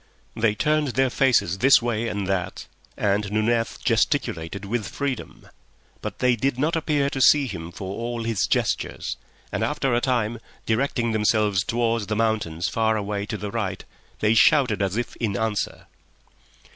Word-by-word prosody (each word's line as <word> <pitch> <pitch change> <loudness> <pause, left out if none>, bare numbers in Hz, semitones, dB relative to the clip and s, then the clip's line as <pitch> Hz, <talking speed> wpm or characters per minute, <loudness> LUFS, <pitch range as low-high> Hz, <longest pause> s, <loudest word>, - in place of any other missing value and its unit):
They 110 -2 +1
turned 150 +4 +1
their 130 +1 +1
faces 120 -10 +2
this 135 +6 +7
way 115 -1 -1
and 100 -3 -2
that, 95 -1 -2 0.3
and 100 0 0
Nunez 115 +2 0
gesticulated 85 +5 0
with 110 +1 -2
freedom. 140 -4 -5 0.5
But - - -5
they 125 -1 +3
did 130 +2 -1
not 155 +5 +1
appear 150 -3 +1
to 135 - -2
see 145 +1 +6
him 85 -8 -6
for 95 +2 -6
all 120 0 -3
his 115 -4 0
gestures, - - -1 0.3
and - - -1
after 135 -2 0
a 120 - +2
time, 120 -3 0 0.3
directing 115 0 0
themselves 105 -3 +2
towards 115 -2 0
the 105 - -1
mountains 105 -7 0
far 110 -1 +1
away 100 0 -3
to 110 - -3
the 105 0 -5
right, 100 -4 -3 0.4
they 110 +1 +4
shouted 115 -1 +4
as 100 +1 0
if 120 - -3
in 105 -4 -1
answer. 110 -1 -2
110 Hz, 160 wpm, -24 LUFS, 100-120 Hz, 0.5 s, this